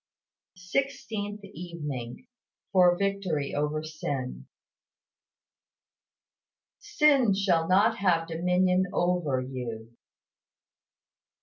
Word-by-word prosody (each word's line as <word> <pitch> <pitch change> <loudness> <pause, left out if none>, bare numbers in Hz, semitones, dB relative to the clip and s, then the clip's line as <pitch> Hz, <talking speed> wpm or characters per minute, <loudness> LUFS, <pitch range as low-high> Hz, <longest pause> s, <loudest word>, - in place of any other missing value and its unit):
SIXTEENTH 205 0 -3
EVENING. 165 - -7 0.5
FOR 180 -2 +5
VICTORY 195 -7 -1
OVER 150 +1 -1
SIN. 145 -5 -5 2.3
"Sin 275 -9 +3
shall 175 -5 +2
not 205 +5 +4
have 170 -4 +2
dominion 180 +2 +2
over 175 -7 0
you." 120 -3 -6
180 Hz, 70 wpm, -28 LUFS, 150-200 Hz, 2.3 s, FOR